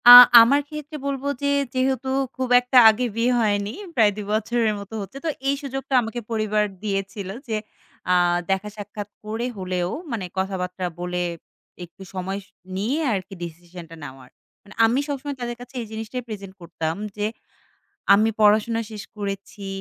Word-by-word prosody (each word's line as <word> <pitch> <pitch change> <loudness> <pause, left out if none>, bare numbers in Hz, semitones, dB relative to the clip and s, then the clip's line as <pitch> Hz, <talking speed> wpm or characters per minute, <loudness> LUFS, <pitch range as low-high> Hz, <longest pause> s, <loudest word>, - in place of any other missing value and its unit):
আ - - +12 0.3
আমার 265 +5 +5
ক্ষেত্রে 300 0 -7
বলবো 280 0 -2 0.2
যে - - +2 0.3
যেহেতু 260 0 0 0.3
খুব 260 -1 -2
একটা 250 +1 +2
আগে 225 +3 +1
বিয়ে 235 +2 +2
হয়নি 205 -2 +1 0.2
প্রায় 220 -4 +5
২ 210 -1 -5
বছরের 220 0 +1
মতো 200 +2 -10
হচ্ছে 200 +7 -8
তো - - +1 0.2
এই 280 - +3
সুযোগটা 270 -1 -5
আমাকে 225 +1 -4
পরিবার 215 -1 +1 0.2
দিয়েছিল 195 -1 -3 0.2
যে 220 - -1 0.6
আ - - +6 0.4
দেখা 195 +2 0
সাক্ষাৎ 205 0 -7 0.2
করে 220 +3 -3
হলেও 180 -2 -2 0.2
মানে 215 -5 -2
কথাবার্তা 185 -1 -2
বলে 180 0 -2 0.6
একটু 175 +3 -20
সময় 190 +1 -3 0.4
নিয়ে 235 +10 0
আর 195 - +1
কি - - -11
ডিসিশনটা 170 0 -9
নেওয়ার 130 -2 -10 0.3
মানে 205 - -14
আমি 235 +4 +2
সবসময় 285 0 -4
তাদের 240 0 -3
কাছে 245 +1 -12
এই - - -5
জিনিসটাই 225 +3 -5
প্রেজেন্ট 200 -3 -7
করতাম 165 -1 -3 0.2
যে 205 - 0 0.9
আমি 215 +2 +4
পড়াশোনা 215 +2 +4
শেষ 210 -2 -7
করেছি 200 0 -5
210 Hz, 160 wpm, -23 LUFS, 195-240 Hz, 0.9 s, আ